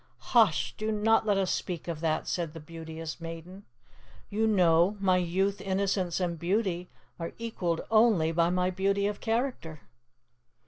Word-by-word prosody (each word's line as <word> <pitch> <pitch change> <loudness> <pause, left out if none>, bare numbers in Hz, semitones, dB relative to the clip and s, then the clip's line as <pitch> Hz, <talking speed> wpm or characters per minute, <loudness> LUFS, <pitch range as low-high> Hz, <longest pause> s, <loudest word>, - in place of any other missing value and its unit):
"Hush! - - +4
do 215 0 -1
not 220 +1 +2
let 205 -2 +3
us 190 -2 +1
speak 175 -3 -3
of 165 -3 -4
that!" 160 -1 -1
said 170 -3 -2
the - - -6
Beauteous 160 +1 -8
Maiden. 165 +4 -8 0.7
"You 220 +2 +1
know, 180 -1 +3
my 185 -2 +3
Youth, 190 +3 0
Innocence, 190 -2 0
and 170 -3 -2
Beauty 180 -1 -1 0.3
are 165 - -5
equalled 185 -8 -2
only 215 -8 +4
by 170 +1 +2
my 180 +1 +1
Beauty 195 +2 0
of 205 0 -2
Character." 225 - -2
180 Hz, 150 wpm, -29 LUFS, 165-205 Hz, 0.7 s, Hush